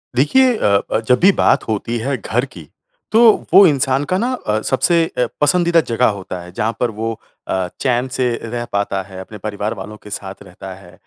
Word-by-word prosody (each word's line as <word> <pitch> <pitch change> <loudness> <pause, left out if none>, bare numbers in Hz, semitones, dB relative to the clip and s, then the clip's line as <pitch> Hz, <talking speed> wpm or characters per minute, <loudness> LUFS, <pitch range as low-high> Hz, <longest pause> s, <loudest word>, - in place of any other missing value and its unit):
देखिए 250 - +3
अ - - -2 0.3
अ, - - +1
जब 125 +3 +1
भी 190 +3 +6
बात - - +3
होती 110 +2 -2
है 135 +5 -2
घर 120 +3 -1
की 85 - -13 0.4
तो 220 - +4 0.3
वो 200 - +9
इंसान 135 -2 +1
का 185 - +2
ना 240 +6 -1 0.2
अ, 105 0 +1
सबसे 165 +8 +2
अ, 125 - +2 0.2
पसंदीदा 170 +2 +3
जगह 120 +2 +3
होता 95 -1 -7
है 90 0 -11
जहाँ 110 +5 -2
पर 120 -2 0
वो 115 0 -2 0.3
अ, 95 -1 -1
चैन 125 -1 +1
से 130 - +1 0.2
रह 120 +1 -4
पाता 100 -1 -1
है। 95 0 -11
अपने 100 +3 -9
परिवार 105 +1 -4
वालों 105 +3 -8
के - - -11
साथ 95 -1 -7
रहता - - -10
है। - - -16
120 Hz, 205 wpm, -18 LUFS, 105-140 Hz, 0.4 s, वो